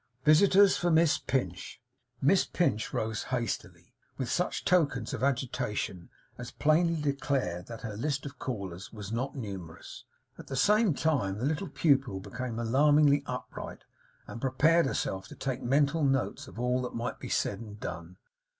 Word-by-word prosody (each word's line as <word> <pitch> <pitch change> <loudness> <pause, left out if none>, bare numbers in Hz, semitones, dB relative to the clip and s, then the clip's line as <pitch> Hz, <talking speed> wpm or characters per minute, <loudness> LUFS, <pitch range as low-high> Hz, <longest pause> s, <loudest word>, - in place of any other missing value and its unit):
'Visitors 190 +5 +6
for 175 - 0
Miss 165 -1 +4
Pinch!' 95 -10 -3 0.4
Miss 185 +8 +5
Pinch 110 -11 0
rose 110 0 -2
hastily; 125 -3 -4 0.2
with 130 -3 -3
such 180 +1 -1
tokens 145 -10 +2
of - - -4
agitation 125 -9 -2 0.3
as 125 0 -6
plainly 165 +4 +2
declared 135 -11 -1
that 115 -2 -8
her 110 -3 -5
list 140 +5 -2
of 140 -2 -8
callers 95 -6 -5
was 105 -2 -8
not 130 +5 -2
numerous. 95 - -8 0.3
At - - -10
the 135 - -4
same 210 - +3
time, 135 -13 0
the 120 - -2
little 155 +5 -1
pupil 135 - +2
became 120 +4 -5
alarmingly 145 +4 +4
upright, 125 0 -6 0.4
and 115 - -8
prepared 150 +5 +3
herself 95 -7 -2
to - - -11
take 130 -1 -3
mental 145 +5 +2
notes 135 0 0
of 125 - -10
all 125 +1 +1
that 125 - -5
might 115 +1 -3
be - - -7
said 100 - 0
and 105 -2 -10
done. 85 0 -7
130 Hz, 160 wpm, -29 LUFS, 110-150 Hz, 0.4 s, Visitors